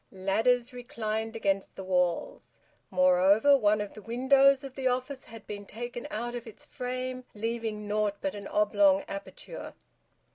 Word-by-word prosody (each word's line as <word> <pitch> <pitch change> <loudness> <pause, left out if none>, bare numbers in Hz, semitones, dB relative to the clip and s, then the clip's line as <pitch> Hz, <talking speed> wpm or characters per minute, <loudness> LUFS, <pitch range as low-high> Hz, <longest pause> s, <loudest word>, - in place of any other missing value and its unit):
Ladders 225 +6 +1
reclined 225 -2 -4
against 195 -3 -1
the 190 - -7
walls. 180 -2 -1 0.3
Moreover, 190 +8 +5
one 210 -5 +3
of 205 - -5
the 215 - -10
windows 265 +4 +4
of 270 -2 -8
the 265 -1 -1
office 255 +2 -2
had 225 -2 -12
been 205 -1 -6
taken 240 +3 -6
out 240 +3 -3
of 240 -1 -6
its 225 +7 -12
frame, 255 -1 -4
leaving 220 -1 -3
naught 210 -1 0
but 290 - -2
an 200 -1 -7
oblong 205 -2 +3
aperture. - - -8
225 Hz, 150 wpm, -29 LUFS, 205-250 Hz, 0.3 s, Moreover